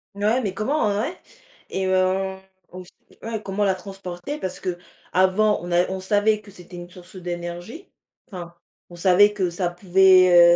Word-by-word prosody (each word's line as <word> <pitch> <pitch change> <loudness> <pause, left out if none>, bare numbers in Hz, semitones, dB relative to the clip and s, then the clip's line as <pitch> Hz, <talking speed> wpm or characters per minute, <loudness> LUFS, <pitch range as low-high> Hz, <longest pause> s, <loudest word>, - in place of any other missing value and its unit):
Ouais, 215 +5 +1
mais 200 -5 -3
comment, 220 +2 0
heu, 200 0 0
ouais. 325 +10 -3 0.5
Et, 190 0 -2
heu, 190 +1 +1 0.4
aussi, 180 0 -10 0.3
ouais, 220 -1 -5
comment 200 +1 -2
la 190 -2 +2
transporter 190 +7 -7
parce 185 -1 -5
qu'avant 185 +3 0
on 175 +1 -7
a 175 +1 +3
on 190 - -3
savait 210 +2 +1
que 210 - -16
c'était 180 -2 -12
une 175 0 -9
source 180 +1 -15
d'énergie. 175 - -6 0.4
Enfin, 175 -5 -9 0.3
on 175 - -12
savait 190 +4 +5
que 185 -4 -1
ça 175 0 -1
pouvait, 180 -1 +6
185 Hz, 165 wpm, -23 LUFS, 175-205 Hz, 0.5 s, pouvait